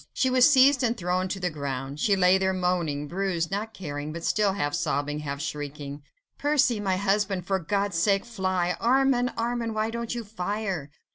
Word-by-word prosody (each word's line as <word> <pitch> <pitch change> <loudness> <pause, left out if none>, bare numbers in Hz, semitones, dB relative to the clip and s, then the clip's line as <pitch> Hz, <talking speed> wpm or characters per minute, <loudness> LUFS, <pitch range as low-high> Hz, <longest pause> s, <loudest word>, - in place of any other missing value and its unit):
She 260 - +1
was 255 +2 +6
seized 270 0 +6
and 240 -1 +1
thrown 180 -1 -1
to 195 - -4
the 180 -2 -1
ground. 140 -1 -5
She 200 +5 +3
lay 190 0 +4
there 190 0 +1
moaning, 175 -6 -1
bruised, 175 -1 -2
not 215 +3 -3
caring, 150 -4 -5
but 165 +1 -7
still 205 +1 +2
half 145 -7 -2
sobbing, 145 +1 -1
half 140 -2 -4
shrieking,— 145 -2 -5 0.4
"Percy, 280 -6 +2
my 190 -2 0
husband, 195 -2 0
for 190 0 0
God's 200 +1 -1
sake 195 +3 +2
fly! 185 -6 -1
Armand! 250 0 +3
Armand! 230 -1 -2
why 215 +1 0
don't 235 +1 -4
you 235 - -4
fire?" 200 -6 -3
190 Hz, 185 wpm, -26 LUFS, 165-220 Hz, 0.4 s, was